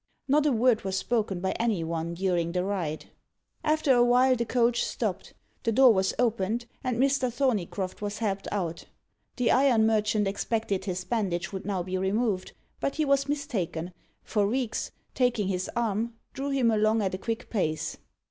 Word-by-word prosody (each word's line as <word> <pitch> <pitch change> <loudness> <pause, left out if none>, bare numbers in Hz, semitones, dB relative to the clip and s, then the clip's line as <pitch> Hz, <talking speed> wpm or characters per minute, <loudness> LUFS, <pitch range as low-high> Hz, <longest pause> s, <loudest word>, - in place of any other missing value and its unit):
Not 295 +2 +3
a - - +3
word 240 -1 +3
was 190 0 -1
spoken 205 -4 -1
by 190 - 0
any 225 -7 +1
one 165 +1 -3
during 175 -2 0
the 180 0 0
ride. 175 -6 -3 0.5
After 305 -3 +3
a 240 -1 +5
while, 250 +2 +4
the 235 -1 -2
coach 235 -1 +2
stopped, - - -3 0.3
the 230 - 0
door 255 +1 +7
was 190 -1 +1
opened, 230 -1 0 0.2
and 250 -3 -1
Mr. 270 -1 +2
Thorneycroft 210 -8 -1
was 205 0 -3
helped 200 -3 -2
out. 170 -5 -3 0.5
The 250 -2 +2
iron 255 -5 +4
merchant 215 -1 +2
expected 200 -1 -1
his 185 -2 -3
bandage 190 -4 -1
would 190 +1 -5
now 190 -3 -1
be 185 +1 -3
removed, 195 0 0 0.3
but 275 - -1
he 310 - +1
was 275 0 +2
mistaken, 180 - -2 0.3
for 205 -2 +1
Reeks, 245 +1 -1 0.2
taking 240 -6 +1
his 185 -1 -2
arm, 230 0 -1 0.2
drew 275 +1 -3
him 260 -4 +2
along 215 0 +2
at 190 - -1
a 185 - -3
quick 230 +2 -4
pace. 155 -8 -1
215 Hz, 175 wpm, -27 LUFS, 190-245 Hz, 0.5 s, door